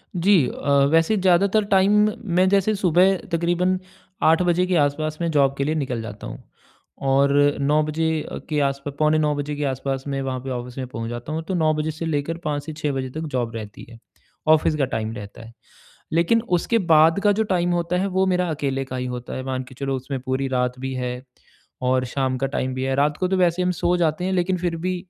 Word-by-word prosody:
जी 180 -4 +4
अ, - - -5 0.2
वैसे 165 +6 +3
ज़्यादातर 190 +3 +3
टाइम 195 +1 +4 0.4
मैं 185 +1 +4
जैसे 200 +2 +2
सुबह 185 0 +3 0.2
तकरीबन 175 +2 +1 0.4
8 160 +2 +5
बजे 180 0 +2
के 185 0 0
आस-पास 155 +1 0
मैं 170 - 0
जॉब 140 -2 +3
के 140 - 0
लिए 155 +3 -1
निकल 130 -6 -2
जाता 110 -2 -8
हूँ। - - -9 0.6
और 140 +1 +3 0.3
9 150 +2 +3
बजे 155 +1 -1 0.4
के 150 - 0
आस-पा 140 +1 -4
पौने 155 0 +3
9 150 -1 +1
बजे 145 +1 -3
के 145 - -3
आस-पास 135 0 -3
में 135 -1 -2
वहाँ 130 -1 -3
पे 135 - -6
ऑफिस 125 0 -6
में 130 -1 -4
पहुँच 115 -2 -5
जाता 120 +5 -6
हूँ 160 - -2
तो 190 - -2
9 155 -2 +2
बजे 155 +1 -2
से 160 +2 -6
लेकर 160 +1 -2
5 145 -1 -1
से 155 - -6
6 150 -1 -2
बजे 130 -1 -3
तक 155 +5 -6
जॉब 120 -2 -2
रहती 105 -2 -8
है, 115 - -13 0.5
ऑफिस 155 0 +4
का 140 - +2
टाइम 110 0 -2
रहता 105 +1 -9
है। 115 - -13 0.6
लेकिन 175 +8 +3 0.2
उसके 230 +6 +1
बाद 160 +4 +6
का 205 - +5
जो 220 +2 +1
टाइम 180 -3 0
होता 175 0 0
है 195 - 0
वो 190 0 +1
मेरा 180 -1 +1
अकेले 140 -3 -2
का 130 -1 -6
ही 125 0 -3
होता 125 0 -6
है 130 - -4
मान 130 -1 -3
के 130 +1 -14
चलो 135 0 -2
उसमें 130 +1 -5
पूरी 130 +1 -2
रात 125 -1 -1
भी 130 0 -4
है 125 0 -4 0.7
और 130 0 +2
शाम 130 0 -1
का 135 - 0
टाइम 130 -1 -2
भी 130 - -3
है 135 0 0
रात 145 +1 +2
को 185 - 0
तो 190 - +1
वैसे 180 0 +2
हम 180 - +1
सो 175 0 +1
जाते 170 0 0
हैं 190 - -1
लेकिन 185 0 +1
फिर 175 -1 -2
भी 180 +2 -2
150 Hz, 230 wpm, -22 LUFS, 130-175 Hz, 0.7 s, बाद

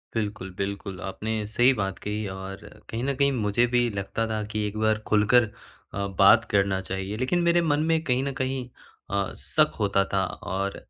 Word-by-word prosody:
बिल्कुल, 105 -3 -3
बिल्कुल। 100 -1 -4
आपने 110 +2 -3
सही 120 +4 +4
बात 95 -4 -2
कही 105 0 -3
और 95 0 -6 0.3
कहीं 115 +2 -3
न 140 +1 0
कहीं 140 +1 +3
मुझे 115 -2 +2
भी 120 -1 +3
लगता 100 +3 -2
था 110 -1 -2
कि 105 0 -1
एक 105 +1 -6
बार 110 0 +2
खुलकर 110 +3 +5 0.5
अ, 100 0 -2
बात 100 +4 +6
करना 100 -1 +2
चाहिए। 95 +2 -4
लेकिन 130 +9 +1
मेरे 170 0 +4
मन 150 -3 +1
में 160 -1 +2
कहीं 130 -3 +1
न 140 - -1
कहीं 130 -1 -3 0.4
अ, 100 0 -1
शक - - +2
होता 100 -1 +2
था 95 -1 +2
और 95 +2 -3
105 Hz, 185 wpm, -26 LUFS, 100-125 Hz, 0.5 s, बात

